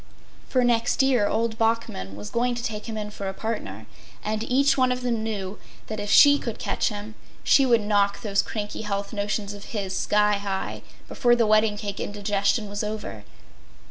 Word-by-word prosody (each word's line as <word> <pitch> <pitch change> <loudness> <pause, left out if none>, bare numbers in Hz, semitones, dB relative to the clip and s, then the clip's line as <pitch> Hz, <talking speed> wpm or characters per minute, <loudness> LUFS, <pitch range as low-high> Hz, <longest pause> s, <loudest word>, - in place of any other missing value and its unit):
For, 255 -1 +2
next 240 +2 +2
year 250 -6 +3
old 225 0 -1
Bachman 225 - -1
was 105 0 -8
going 245 +1 +1
to 240 - -5
take 215 -2 -4
him 220 - -4
in 210 -1 -4
for 200 -2 -5
a 190 - -6
partner. 225 +1 -4 0.4
And 215 0 -2
each 275 +4 +3
one 255 -1 +3
of 250 0 -2
them 240 -3 -1
knew 205 -3 -4 0.3
that 215 - -5
if 205 - -4
she 285 +4 +7
should 230 -2 -4
catch - - 0
him 210 0 -7 0.3
she 270 -2 +5
would 235 -3 +4
knock 205 -1 +1
those 200 -2 +2
cranky 210 -1 -5
health 200 0 -3
notions 205 0 -2
of 205 0 -10
his 195 -4 -4
sky 210 +1 +2
high 195 -1 -4 0.3
before 240 -2 +3
the 235 -1 +3
wedding 215 0 +3
cake 205 -2 -5
indigestion 205 +1 0
was 205 +1 -4
over. 210 - -5
215 Hz, 190 wpm, -25 LUFS, 205-230 Hz, 0.4 s, she